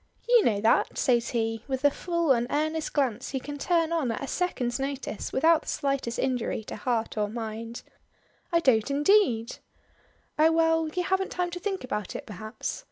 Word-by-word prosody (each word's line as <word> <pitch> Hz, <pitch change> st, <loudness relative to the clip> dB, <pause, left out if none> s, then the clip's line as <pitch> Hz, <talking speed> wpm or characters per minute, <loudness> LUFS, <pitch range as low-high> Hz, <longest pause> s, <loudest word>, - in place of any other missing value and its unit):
"You 480 Hz, -3 st, +6 dB
know 205 Hz, -3 st, +2 dB
that!" 225 Hz, -, +2 dB
says 235 Hz, -2 st, +2 dB
he, 225 Hz, -1 st, -1 dB
with 265 Hz, 0 st, -3 dB
the 285 Hz, -, +5 dB
full 340 Hz, -1 st, 0 dB
and 240 Hz, -2 st, +2 dB
earnest 310 Hz, +2 st, -1 dB
glance 255 Hz, -4 st, 0 dB
he 265 Hz, -, -2 dB
can 290 Hz, +2 st, -7 dB
turn 335 Hz, 0 st, +1 dB
on 315 Hz, -7 st, 0 dB
at 230 Hz, -, -4 dB
a -, -, -1 dB
second's 265 Hz, -9 st, -1 dB
notice 270 Hz, -5 st, -4 dB
without 320 Hz, +4 st, +4 dB
the -, -, -19 dB
slightest 275 Hz, -5 st, -1 dB
injury 250 Hz, -4 st, -1 dB
to -, -, -7 dB
heart 225 Hz, 0 st, -2 dB
or 210 Hz, -1 st, 0 dB
mind. 225 Hz, +1 st, -6 dB, 0.7 s
"I 335 Hz, 0 st, +3 dB
don't 240 Hz, -5 st, +3 dB
indeed." 280 Hz, -, +3 dB, 0.8 s
"Oh 315 Hz, +1 st, +6 dB
well, 325 Hz, 0 st, +3 dB
you 360 Hz, +3 st, -2 dB
haven't 380 Hz, +1 st, 0 dB
time 360 Hz, -1 st, -2 dB
to 355 Hz, -, -5 dB
think 385 Hz, -2 st, -3 dB
about 210 Hz, -6 st, -4 dB
it -, -, -6 dB
perhaps. 215 Hz, -, -5 dB
270 Hz, 185 wpm, -27 LUFS, 230-325 Hz, 0.8 s, You